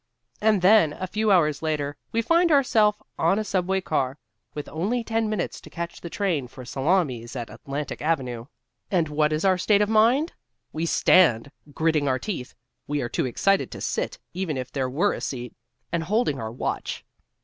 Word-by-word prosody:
And 210 -3 +3
then, 185 -6 +6
a 185 - -4
few 215 +3 -1
hours 155 -6 +3
later, 150 -2 -1 0.2
we 230 0 0
find 335 +6 +3
ourself 220 -7 +4 0.2
on 170 +5 +3
a 215 - 0
subway 190 -1 0
car 135 -6 -1 0.4
with 150 - -5
only 210 +10 -1
ten 225 -1 0
minutes 210 -5 -3
to - - -13
catch 170 0 -6
the 170 - -6
train 175 - -1
for 125 +1 -11
Salamis 135 -4 0
at 120 -2 -5
Atlantic 140 +1 -5
Avenue. 130 -7 -1 0.4
And 170 -5 +1
what 150 0 +1
is 155 +4 0
our 185 -1 +3
state 205 +2 +4
of 205 - -2
mind? 235 +9 +3 0.4
We 160 +2 -2
stand, 140 -9 +4 0.2
gritting 160 -3 +1
our 130 -1 +2
teeth 145 -6 -5 0.3
(we 145 0 -1
are 120 - -3
too - - -1
excited 195 +10 +1
to - - -8
sit, - - -2 0.2
even 175 -5 -2
if 130 -1 -5
there 130 -2 -1
were 170 +11 +1
a - - -6
seat) 125 -2 -5 0.4
and 170 - 0
holding 205 - +1
our 110 -1 -4
watch. 120 - -4
165 Hz, 185 wpm, -25 LUFS, 140-210 Hz, 0.4 s, then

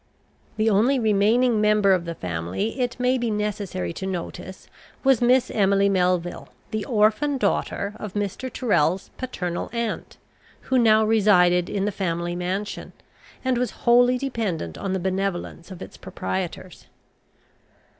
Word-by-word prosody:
The 215 +1 +1
only 225 +6 +3
remaining 220 +1 +3
member 210 -2 +4
of 180 -2 0
the 170 0 -5
family 90 - -3
it 245 0 -2
may 250 +1 +2
be 240 -1 -1
necessary 205 - -3
to 190 - -5
notice 185 0 -6 0.4
was 270 -3 +4
Miss 250 +1 +3
Emily 200 -1 +3
Melville, 180 -2 0 0.2
the 215 -1 -2
orphan 225 +6 +2
daughter 200 -2 -1
of 210 -3 -6
Mr. 205 +5 -3
Tyrrel's 190 - 0
paternal 180 -9 -4
aunt; 235 -2 -4 0.4
who 260 -1 +1
now 220 -2 +5
resided 180 -5 +4
in 195 -1 -1
the 210 - 0
family 175 -3 -2
mansion, 185 +4 -4 0.5
and 255 -2 +1
was 250 - 0 0.2
wholly 245 +1 +5
dependent 220 - -3
on 195 - -3
the 190 - -1
benevolence 185 -2 -3
of 185 -3 -8
its - - -12
proprietors. 95 0 -5
205 Hz, 140 wpm, -24 LUFS, 180-235 Hz, 0.5 s, now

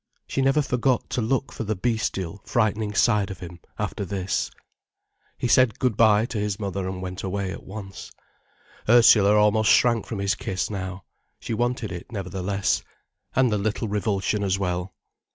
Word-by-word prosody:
She 135 - -2
never 135 +3 +3
forgot 125 -1 0
to 125 - 0
look 130 +4 0
for - - -5
the 110 0 -1
bestial, 100 -4 -2
frightening 110 -2 0
side 105 -3 +3
of 95 - -6
him, 90 -1 -9 0.2
after - - -3
this. 95 0 -2 0.9
He - - -1
said 120 -2 +4
"Good 125 -4 +1
bye" 110 -1 +5
to 120 -3 -4
his 105 0 -2
mother 100 -2 -3
and 95 0 -5
went 90 0 -5
away 95 0 -2
at - - -7
once. 95 -1 -9 0.8
Ursula 110 -3 +7
almost 105 +1 +4
shrank 120 -3 +4
from 110 - -4
his 100 0 +1
kiss, 95 +2 -3
now. 95 -1 -5 0.4
She - - -4
wanted 120 -1 -1
it, 90 +4 -8
nevertheless, 95 -1 -1 0.5
and 130 -2 +3
the 105 - +1
little 110 +2 -1
revulsion 105 0 -1
as 95 -1 +1
well. 90 -1 -2
105 Hz, 170 wpm, -24 LUFS, 95-115 Hz, 0.9 s, Ursula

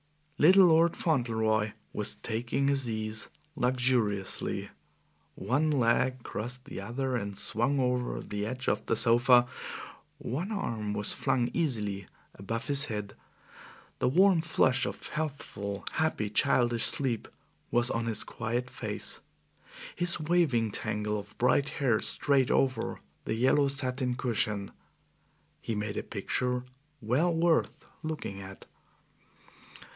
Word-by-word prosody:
Little 185 +5 +8
Lord 165 0 +4
Fauntleroy 110 -7 +1 0.2
was - - 0
taking 120 +4 -1
his 135 -3 +1
ease 110 0 -2 0.3
luxuriously. 125 -7 0 0.7
One 145 +5 0
leg 130 -2 +2
crossed 125 +4 -4
the 95 - -7
other 125 +5 -2
and 100 -4 -3
swung 120 +7 +1
over 125 -1 0
the 105 0 -4
edge 130 +2 -5
of - - +1
the - - +2
sofa; 120 +2 +5 0.7
one 165 - -4
arm 110 - -2
was 105 0 0
flung 120 -2 0
easily 105 - -1 0.3
above 115 +4 -4
his 140 +2 +3
head; 105 -5 -5 0.9
the - - +2
warm 185 +3 +5
flush 130 -6 +2
of - - -6
healthful, 115 -10 -4
happy, 155 -10 -1
childish 120 +2 +3
sleep 125 -5 0 0.4
was 120 0 +2
on 115 0 -1
his 110 -2 +1
quiet 120 +2 -3
face; - - -4 0.8
his 175 -1 -1
waving 150 -9 +2
tangle 105 +1 -2
of 100 +1 -12
bright 135 +3 +3
hair 120 -6 +2
strayed 135 -3 +2
over 130 -1 +1 0.3
the - - -1
yellow 130 +4 +3
satin 130 -2 -1
cushion. 105 -5 -1 0.9
He 115 - -3
made 105 0 -3
a - - 0
picture 125 +4 -2 0.4
well 130 +11 +1
worth 165 0 +1 0.2
looking 150 -11 -5
at. 95 0 -10
125 Hz, 125 wpm, -29 LUFS, 110-140 Hz, 0.9 s, Little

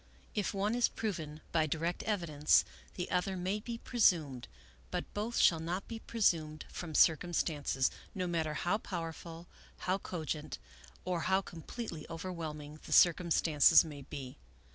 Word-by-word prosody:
If 205 -2 0
one 200 +2 0
is 245 0 +3
proven 160 -8 -4
by 160 -2 +2
direct 165 +4 -1
evidence, 170 -8 +3 0.3
the 180 0 -4
other 185 +1 0
may 185 +4 -1
be 235 +2 -5
presumed; 165 - +2 0.4
but - - -4
both 220 +3 -2
shall 165 - +5
not 175 +4 -3
be 225 -1 -6
presumed 160 -10 0
from 160 -3 -6
circumstances, 155 -5 +2 0.2
no 185 -2 -1
mat 170 -2 0
ter 155 - -2
how 180 +7 0
powerful, 165 -3 -6 0.4
how 185 +1 0
cogent, 160 -5 -4 0.5
or 180 -2 0
how 190 +1 +4
completely 170 0 -7
over 170 +3 -5
whelming 155 -2 -6
the - - -9
circumstances 165 -2 +6
may 145 -3 -8
be. 135 -1 -8
170 Hz, 145 wpm, -33 LUFS, 155-190 Hz, 0.5 s, circumstances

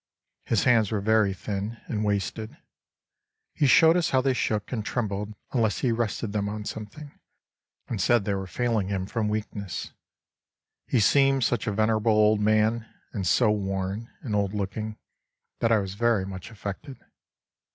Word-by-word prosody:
His 115 - +2
hands 115 -5 +4
were 110 - 0
very 110 0 +3
thin 100 +4 -4
and 110 -2 -2
wasted, 105 +2 -2 1.0
he 145 - +2
showed 160 +5 +6
us 175 -2 +2
how 130 - +3
they 135 0 +2
shook 105 -4 -1
and 115 -4 -2
trembled 105 -2 -3 0.2
unless 115 -5 +1
he 125 - +2
rested 115 -2 -2
them 100 -1 -1
on 105 0 -5
something, 110 +9 -7 0.8
and 110 -5 -3
said 120 +1 +3
they 100 - 0
were 95 -1 -3
failing 115 0 0
him 95 -2 -2
from 105 +1 -1
weakness.... 105 -3 -4 1.0
He 125 - +2
seemed 135 +4 +4
such 120 -1 0
a - - +1
venerable 110 +1 +2
old 105 0 +4
man, 110 +2 +2 0.2
and 95 -4 -2
so 110 +2 +4
worn 100 +2 -2
and 115 - -4
old 100 0 0
looking, 105 +2 -3 0.6
that 115 - +2
I 115 - +6
was 95 -2 -3
very 110 -2 +1
much 95 -2 -7
affected. 115 +6 -7
110 Hz, 160 wpm, -26 LUFS, 100-115 Hz, 1.0 s, showed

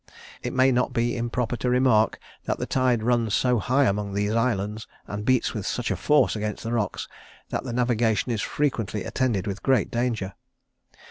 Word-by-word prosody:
It - - -3
may 130 +1 +4
not 125 0 +1
be 120 +1 0
improper 120 0 -1
to 125 - -1
remark, 125 -4 +3 0.3
that - - -1
the - - -3
tide 125 -4 +1
runs 115 -3 +2
so 125 -2 +2
high 130 +7 +2
among 100 -3 0
these 105 +1 0
islands, 110 -2 -1 0.2
and 105 0 -5
beats 130 +2 +2
with 105 - -4
such 125 - -1
force 150 -5 +3
against 105 -1 -3
the 115 - -3
rocks, 105 -5 -2 0.4
that - - -3
the 125 - -4
navigation 120 -1 +1
is 110 -3 -1
frequently 115 -8 -1
attended 120 -8 -1
with 100 0 -4
great 130 -6 +2
danger. 115 -5 -1
115 Hz, 180 wpm, -25 LUFS, 105-125 Hz, 0.4 s, may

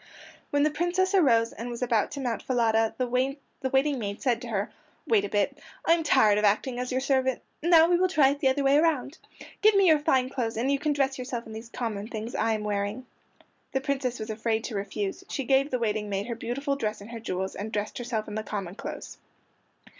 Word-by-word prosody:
When 285 0 +2
the 305 - +3
Princess 360 +4 0
arose 235 -11 +4
and 235 +2 -6
was 240 +1 -4
about 230 -4 +1
to 285 - -5
mount 240 -5 -2
Falada 225 -3 +1
the 255 - 0
waiting 265 +2 -1
maid 200 -2 -4
said 240 -3 0
to 245 - -7
her, 205 -1 -2 0.3
"Wait 215 -4 +3
a 205 - -3
bit! 205 0 0 0.3
I 330 - +6
am 335 - +2
tired 220 -9 +4
of - - -2
acting 230 +5 +1
as 250 +1 -3
your 255 - +1
servant. 260 -2 +1 0.2
Now, 330 0 +6
we 350 0 +3
will 370 +1 +3
try 300 -7 +4
it 285 +1 -2
the 270 - +2
other 270 +2 +2
way 275 +1 +5
around. 305 -2 +1 0.4
Give 430 0 +5
me 395 -1 +5
your 315 -4 +6
fine 260 -3 +2
clothes, 235 -4 -3
and 255 +4 +1
you 280 - +1
can 300 0 0
dress 270 -2 0
yourself 245 -2 -4
in 220 - -9
these 225 +1 -8
common 220 -4 -4
things 225 +1 -6
I 225 - +1
am 215 -1 -2
wearing." 205 +4 -2 0.7
The 265 - +1
Princess 265 -3 -2
was 220 0 -4
afraid 220 0 -1
to 235 - -5
refuse; 200 0 -3
she 275 - -2
gave 270 +2 +3
the 255 - 0
waiting 215 -3 -1
maid 200 0 -2
her 235 0 -4
beautiful 275 +5 -2
dress 215 -6 -3
and 205 +3 -11
her 230 - -6
jewels, 190 -3 -3
and 215 +2 -5
dressed 210 +1 -3
herself 235 -3 -3
in 210 - -7
the 215 - -2
common 195 -4 -5
clothes. 215 - -8
245 Hz, 230 wpm, -27 LUFS, 220-275 Hz, 0.7 s, I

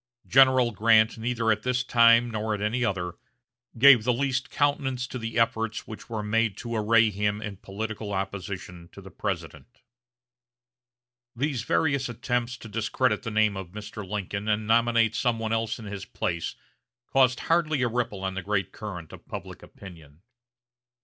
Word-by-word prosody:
General 130 -2 +5
Grant 110 +1 +3
neither 115 -1 0
at 105 -1 0
this 125 0 0
time 115 -1 +5
nor 110 0 -2
at - - -7
any 115 +5 0
other, 90 -5 -2 0.6
gave 130 -2 +8
the 125 - +2
least 130 +1 -1
countenance 135 -3 0
to 125 - -6
the 115 0 -4
efforts 115 -1 0
which 110 - -10
were 110 -2 -3
made 115 0 0
to 115 0 -5
array 110 0 +4
him 105 +1 -1
in 105 -3 -6
political 105 +2 -5
opposition 95 -3 -5
to - - -11
the - - -12
President. - - -6 1.5
These 135 0 -1
various 140 +1 0
attempts 120 0 -2
to 115 - -11
discredit 115 +4 0
the 115 - -4
name 105 -2 +2
of 95 -2 -7
Mr. 105 0 -7
Lincoln 100 +1 -4
and 105 0 0
nominate 115 0 +3
some 120 0 0
one 110 0 -2
else 115 0 -1
in 115 - -10
his 100 -1 -6
place 85 -2 -3 0.5
caused 130 -1 +2
hardly 155 -5 +1
a - - +3
ripple 115 -5 -2
on 95 0 -2
the 95 - -4
great 100 -1 -1
current 90 -7 -8
of - - -13
public - - -8
opinion. 80 -4 -14
110 Hz, 165 wpm, -26 LUFS, 105-120 Hz, 1.5 s, gave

